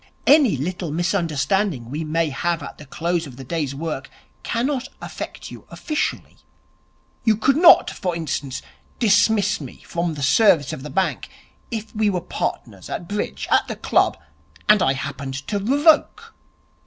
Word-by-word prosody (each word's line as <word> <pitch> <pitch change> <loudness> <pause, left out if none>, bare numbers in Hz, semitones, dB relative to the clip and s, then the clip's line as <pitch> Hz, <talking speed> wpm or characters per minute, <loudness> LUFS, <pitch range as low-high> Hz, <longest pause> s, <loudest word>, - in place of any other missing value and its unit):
Any 275 - +5
little 175 +4 -3
misunderstanding 170 - 0
we 155 +3 -3
may 160 +1 0
have 165 +3 -1
at - - -9
the 150 - -12
close 170 +2 -2
of 130 - -11
the 135 - -8
day's 140 0 -3
work 150 -2 -4 0.3
cannot 260 +2 -1
affect - - -7
you - - -12
officially. 305 -2 -3 0.9
You 220 -3 +3
could 265 +5 +3
not, 340 +3 +7
for 180 -4 -3
instance, 145 -5 -4 0.3
dismiss 205 -3 +3
me 130 - -10
from 170 -1 -2
the 145 - -5
service 150 - +4
of - - -6
the 150 - -7
bank 190 +2 -1 0.4
if 220 -2 -6
we 215 -1 +2
were 185 -3 0
partners 110 - -5
at 170 - -5
bridge 205 +2 -3
at - - +4
the - - -4
club - - +2 0.5
and 210 -2 +6
I 135 - +3
happened 135 0 -5
to 205 - 0
revoke.' 290 +9 +2
175 Hz, 155 wpm, -22 LUFS, 145-210 Hz, 0.9 s, not